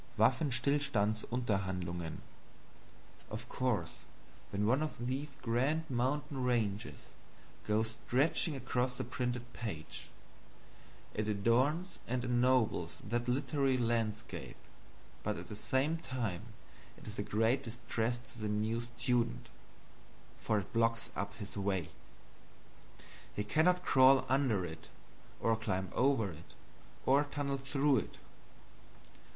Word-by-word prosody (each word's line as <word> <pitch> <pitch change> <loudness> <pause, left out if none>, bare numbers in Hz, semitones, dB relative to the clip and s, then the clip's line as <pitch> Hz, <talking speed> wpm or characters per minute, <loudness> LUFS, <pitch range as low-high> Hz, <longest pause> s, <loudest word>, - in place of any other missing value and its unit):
Waffenstillstandsunterhandlungen. 110 - +1 1.1
Of - - -6
course 105 -10 -1 0.5
when 100 +1 0
one 130 +7 +3
of 150 -6 -3
these 135 +4 -1 0.2
grand 135 +7 +1
mountain 135 +2 0
ranges 115 -3 -1 0.6
goes 110 +1 +2 0.2
stretching 145 +4 +3
across 125 -1 -1
the - - -1
printed 125 -1 -3
page, 100 -10 -5 1.0
it 105 0 -1
adorns 130 - +2
and 125 0 -1
ennobles 120 -8 +2
that 120 +1 -1
literary 135 +1 +2
landscape 115 - -1 0.7
but - - -1
at - - -8
the 105 - -5
same 140 +9 +1
time 120 - -3 0.5
it - - -14
is 110 -1 -6
a - - +2
great 110 +5 +2
distress 115 0 -2
to 120 0 -14
the 105 - -1
new 110 +2 0
student, 120 0 0 0.9
for 110 - +1
it 100 +1 -4
blocks 115 0 +1
up 100 +2 -3
his 100 -3 -6
way; 95 -4 0 1.5
he 105 - 0
cannot 180 +10 +3
crawl 130 0 +6
under 130 -8 +2
it, 80 -1 -8 0.5
or 115 - +3
climb 95 -4 -2
over 125 -7 +3
it, 80 +1 -13 0.5
or 140 +3 +5
tunnel 140 -1 -2
through 135 +1 +3
it. - - -3
120 Hz, 115 wpm, -34 LUFS, 105-130 Hz, 1.5 s, crawl